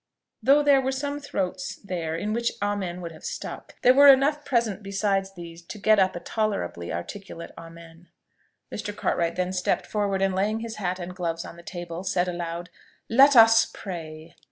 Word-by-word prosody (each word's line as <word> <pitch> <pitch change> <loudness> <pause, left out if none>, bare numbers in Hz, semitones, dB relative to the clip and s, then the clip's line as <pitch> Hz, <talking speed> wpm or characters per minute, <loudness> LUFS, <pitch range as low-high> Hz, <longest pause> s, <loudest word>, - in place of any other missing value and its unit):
Though 285 +2 +5
there 280 -2 +5
were 265 0 -1
some 285 +2 -3
throats 270 -1 -3
there 170 -5 -4
in 210 +6 -2
which 235 +1 0
Amen 200 -3 -2
would 170 -1 -6
have 155 - -14
stuck, - - -7
there 250 - +7
were 285 +2 +7
enough 280 +2 +5
present 230 -7 0
besides 195 -1 -1
these 170 -1 -10
to - - -7
get 215 +1 +4
up 190 -1 +2
a - - -4
tolerably 175 - -3
articulate 170 - -7
Amen. 165 +1 -13 0.7
Mr. 205 -1 -5
Cartwright 170 -4 0
then 180 0 -1
stepped 180 -1 0
forward, 200 -2 -1
and 195 -1 +1
laying 210 +4 0
his 225 -1 -6
hat 185 -3 -2
and 180 0 -7
gloves 170 -2 -3
on - - -10
the 170 - -13
table, 175 0 -7
said 185 -1 0
aloud, 175 0 -5 0.4
"Let 275 +4 +6
us 225 -1 +7
pray!" 160 -4 -8
195 Hz, 180 wpm, -25 LUFS, 170-225 Hz, 0.7 s, there